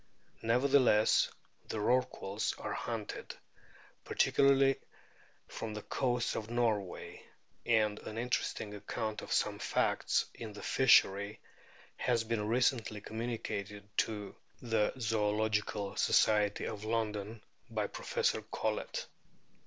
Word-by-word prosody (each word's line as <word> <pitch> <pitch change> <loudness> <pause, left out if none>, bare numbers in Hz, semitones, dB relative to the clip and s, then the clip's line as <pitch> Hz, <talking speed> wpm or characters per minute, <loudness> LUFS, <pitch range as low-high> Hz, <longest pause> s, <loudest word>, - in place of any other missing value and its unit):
Nevertheless, 125 -2 +4 0.4
the - - -4
Rorquals 110 -3 0
are - - -4
hunted, - - -5 0.7
particularly 135 0 +4 0.7
from 110 -2 -5
the 105 - -6
coasts 125 -3 0
of 110 0 -4
Norway; 110 -6 -1 0.5
and 110 -2 +3
an 110 - -7
interesting 115 -3 -2
account 105 +1 -4
of - - -9
some - - +1
facts - - +1
in 110 -2 -8
this 100 - -8
fishery 100 -5 +4 0.6
has 120 -2 +1
been 110 -2 -1
recently 115 -2 +1
communicated 105 -3 -4
to 105 -2 -1 0.2
the 115 -3 +1
Zoological 105 -2 0
Society 105 -2 +3
of 105 -1 -5
London 110 -1 -2 0.3
by - - -1
Professor 485 -1 -1
Collett. - - -3
110 Hz, 105 wpm, -33 LUFS, 105-120 Hz, 0.7 s, Nevertheless